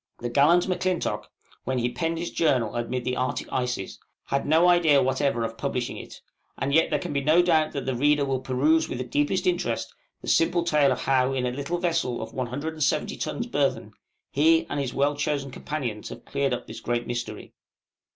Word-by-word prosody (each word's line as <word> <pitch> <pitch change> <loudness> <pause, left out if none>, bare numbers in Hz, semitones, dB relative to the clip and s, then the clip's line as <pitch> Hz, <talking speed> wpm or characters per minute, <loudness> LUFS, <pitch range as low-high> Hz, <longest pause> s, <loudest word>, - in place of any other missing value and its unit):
The 120 - -4
gallant 155 +9 +4
M'Clintock, 185 -1 -1 0.3
when 130 +1 -1
he 120 0 0
penned 165 +7 -2
his 170 +1 -4
journal 125 -9 +1
amid 120 +1 -2
the 125 0 0
Arctic 130 0 -2
ices, 125 -6 -2 0.3
had 140 0 -1
no 160 +4 +5
idea 170 -5 +5
whatever 130 -2 +1
of 115 0 -5
publishing 130 -3 -2
it; - - -10 0.4
and 140 +1 -1
yet 160 - +4
there - - +1
can 175 - -5
be 140 - 0
no 160 +5 +5
doubt 160 -3 +2
that 140 - -4
the 130 - -1
reader 145 +3 +3
will 135 -1 -1
peruse 145 +6 +2
with - - -3
the 130 - -2
deepest 145 +8 0
interest 175 -10 -1 0.3
the - - -11
simple 170 +1 +3
tale 150 -5 +3
of - - -1
how, 130 0 +2
in 130 -1 -1
a 125 - 0
little 140 +7 -3
vessel 165 -8 0
of 110 +1 -7
170 145 +4 -1
tons - - -3
burthen, - - -1 0.4
he 160 +3 +4
and - - -1
his 135 -3 -2
well 145 +2 +1
chosen 145 -1 -2
companions 125 -7 -4
have - - -10
cleared 140 -1 -1
up 125 - -3
this 110 - -8
great 120 0 -2
mystery. 120 0 -5
140 Hz, 200 wpm, -26 LUFS, 125-160 Hz, 0.4 s, no